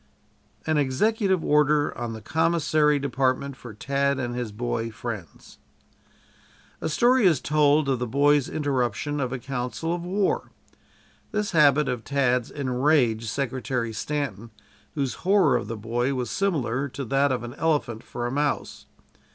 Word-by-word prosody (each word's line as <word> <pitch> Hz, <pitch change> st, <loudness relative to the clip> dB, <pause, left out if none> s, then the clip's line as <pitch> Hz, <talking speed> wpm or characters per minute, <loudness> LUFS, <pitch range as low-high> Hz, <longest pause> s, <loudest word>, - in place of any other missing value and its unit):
AN 155 Hz, -1 st, +2 dB
EXECUTIVE 190 Hz, -, +1 dB
ORDER 150 Hz, 0 st, +3 dB
ON 120 Hz, -1 st, -4 dB
THE 110 Hz, -1 st, -9 dB
COMMISSARY 155 Hz, 0 st, +2 dB
DEPARTMENT 135 Hz, 0 st, -1 dB
FOR 125 Hz, -3 st, -10 dB
TAD 140 Hz, +4 st, 0 dB
AND 120 Hz, -2 st, -3 dB
HIS 120 Hz, -3 st, -4 dB
BOY 115 Hz, +1 st, -2 dB
FRIENDS 105 Hz, -8 st, -8 dB, 1.2 s
A -, -, -1 dB
story 240 Hz, +6 st, +4 dB
is 160 Hz, -7 st, +3 dB
told 150 Hz, 0 st, +3 dB
of 130 Hz, -3 st, +1 dB
the 125 Hz, -, -2 dB
boy's 145 Hz, +3 st, +3 dB
interruption 145 Hz, -1 st, -1 dB
of 130 Hz, -3 st, -1 dB
a 135 Hz, -, -2 dB
council 130 Hz, +6 st, -3 dB
of 175 Hz, -1 st, -4 dB
war. 190 Hz, +3 st, 0 dB, 0.8 s
This 210 Hz, -1 st, -1 dB
habit 150 Hz, -2 st, +4 dB
of 125 Hz, -3 st, -2 dB
Tad's 125 Hz, -4 st, +1 dB
enraged 130 Hz, -4 st, +1 dB
Secretary 125 Hz, -2 st, -2 dB
Stanton, 115 Hz, -3 st, -3 dB, 0.5 s
whose 140 Hz, -4 st, -1 dB
horror 190 Hz, -5 st, +4 dB
of 120 Hz, -, -2 dB
the 115 Hz, +1 st, -5 dB
boy 120 Hz, +5 st, -1 dB
was 125 Hz, -3 st, -3 dB
similar 140 Hz, -9 st, -1 dB
to 135 Hz, +2 st, -6 dB
that 135 Hz, +3 st, +2 dB
of 125 Hz, -2 st, -1 dB
an 120 Hz, 0 st, -7 dB
elephant 145 Hz, -7 st, -1 dB
for 120 Hz, -, -6 dB
a 120 Hz, -, -2 dB
mouse. 145 Hz, +1 st, -2 dB
140 Hz, 150 wpm, -25 LUFS, 120-150 Hz, 1.2 s, story